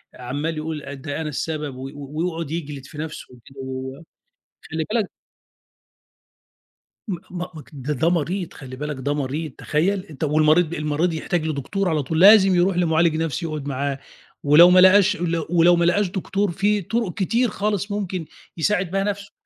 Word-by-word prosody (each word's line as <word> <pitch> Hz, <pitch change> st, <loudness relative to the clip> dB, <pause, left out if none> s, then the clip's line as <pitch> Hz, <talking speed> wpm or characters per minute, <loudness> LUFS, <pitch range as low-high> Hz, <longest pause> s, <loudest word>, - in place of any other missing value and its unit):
عَمّال 145 Hz, +6 st, -4 dB
يقول 155 Hz, -1 st, -4 dB
آآ 140 Hz, -, -7 dB
ده 145 Hz, +3 st, -5 dB
أنا 155 Hz, -, -3 dB
السبب 150 Hz, -1 st, -4 dB
و 130 Hz, +1 st, -7 dB
ويقعد 155 Hz, +2 st, -4 dB
يجلد 150 Hz, -5 st, -5 dB
في 150 Hz, -, -12 dB
نَفْسه 155 Hz, 0 st, -6 dB
وكده 130 Hz, +3 st, -18 dB
و 130 Hz, 0 st, -6 dB
و -, -, -14 dB, 0.7 s
خلّي 160 Hz, -1 st, -2 dB
بالك 215 Hz, -3 st, 0 dB, 2.0 s
م 185 Hz, -4 st, -2 dB
مك 175 Hz, -4 st, -7 dB
ده 145 Hz, +2 st, -3 dB
ده 160 Hz, +5 st, +1 dB
مريض 175 Hz, +2 st, -1 dB
خلّي 130 Hz, -2 st, -9 dB
بالك 150 Hz, +2 st, -4 dB
ده 140 Hz, +2 st, -1 dB
مريض، 145 Hz, +2 st, -3 dB
تخيّل؟ 185 Hz, +6 st, 0 dB
أنت 155 Hz, -3 st, -8 dB
والمريض 155 Hz, +3 st, +3 dB
المريض 155 Hz, +2 st, 0 dB
يحتاج 160 Hz, +1 st, -2 dB
لدكتور 170 Hz, +7 st, -2 dB
على 155 Hz, -3 st, 0 dB
طول 160 Hz, +4 st, -2 dB
لازم 195 Hz, -1 st, +7 dB
يروح 180 Hz, +1 st, +2 dB
لمعالج 165 Hz, -2 st, +2 dB
نَفْسي 165 Hz, +1 st, -2 dB
يقعد 155 Hz, -3 st, -4 dB
معاه 140 Hz, 0 st, -2 dB, 0.4 s
ولو 155 Hz, +5 st, +8 dB
ما 185 Hz, 0 st, +6 dB
لقاش 190 Hz, +2 st, +6 dB
ولو 170 Hz, -2 st, -2 dB
ولو 175 Hz, 0 st, +5 dB
ما 170 Hz, 0 st, +2 dB
لقاش 200 Hz, +3 st, +2 dB
دكتور 195 Hz, +1 st, -1 dB
في 205 Hz, +3 st, +1 dB
طُرُق 225 Hz, 0 st, -2 dB
كتير 230 Hz, +4 st, +1 dB
خالص 205 Hz, 0 st, -2 dB
ممكن 190 Hz, -4 st, -3 dB, 0.3 s
يساعد 185 Hz, +1 st, 0 dB
بها 195 Hz, 0 st, 0 dB
نَفْسه. 200 Hz, 0 st, -4 dB
165 Hz, 170 wpm, -22 LUFS, 150-185 Hz, 2.0 s, ولو